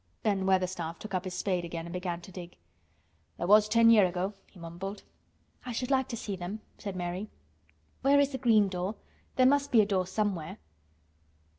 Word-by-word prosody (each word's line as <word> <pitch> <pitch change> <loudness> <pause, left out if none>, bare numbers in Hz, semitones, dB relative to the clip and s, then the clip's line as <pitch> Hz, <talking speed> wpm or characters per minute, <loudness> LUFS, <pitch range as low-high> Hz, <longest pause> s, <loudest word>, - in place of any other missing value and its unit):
Ben 195 -3 +1
Weatherstaff 180 -3 0
took 215 -2 -9
up 185 0 -1
his 185 -1 -5
spade 180 -1 -1
again 170 -1 -5
and 170 - -8
began 180 -1 -3
to 180 - -12
dig. 175 -1 -9 0.8
"There - - -2
was 210 +3 +6
ten 230 +1 +6
year' 210 -5 +6
ago," 180 +3 -2
he - - -20
mumbled. 175 +5 -7 0.6
"I 250 - -5
should 250 +3 -3
like 265 -1 +2
to 235 - -5
see 205 -2 -4
them," 185 +4 -6 0.2
said 200 -2 -5
Mary. 180 +3 -4 0.7
"Where 280 +2 +5
is 285 0 +3
the 265 - -4
green 220 -5 +4
door? 185 +2 -3 0.4
There 255 - +4
must 280 +1 +3
be 235 - +6
a - - +2
door 190 -3 0
somewhere." 190 -5 -2
195 Hz, 190 wpm, -30 LUFS, 180-220 Hz, 0.8 s, was